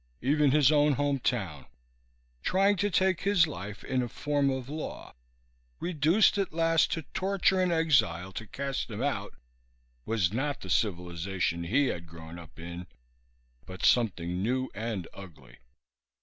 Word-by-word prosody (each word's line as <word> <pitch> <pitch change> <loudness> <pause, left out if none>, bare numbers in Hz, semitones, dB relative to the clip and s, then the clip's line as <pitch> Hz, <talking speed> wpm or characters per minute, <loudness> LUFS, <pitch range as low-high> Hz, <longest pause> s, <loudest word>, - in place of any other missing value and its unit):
Even 145 +2 +3
his 145 0 +5
own 150 -1 +4
home 145 0 0
town, 95 - -2 0.7
trying 195 - +3
to 205 +3 +1
take 185 -1 +2
his 200 -4 +4
life 105 - -7
in 130 -1 0
a 125 - -2
form 145 +2 0
of 130 -2 -3
law, 155 +2 -6 0.7
reduced 175 +5 +3
at 195 - -1
last 165 0 +2
to 165 - -3
torture 190 0 +2
and 180 -1 +2
exile 135 - +2
to 110 +3 -7
cast 135 +4 -3
him 110 +3 -4
out, 145 - -2 0.7
was 105 - 0
not 140 +4 -2
the 95 - -6
civilization 90 -2 -1
he 140 +12 +2
had 85 -9 -3
grown 80 +1 -10
up 80 -8 -14
in 85 +2 -7 0.8
but 95 0 -4
something 90 -7 +2
new 130 +5 0
and 110 -5 -4
ugly. 95 -6 -13
130 Hz, 150 wpm, -29 LUFS, -, 0.8 s, his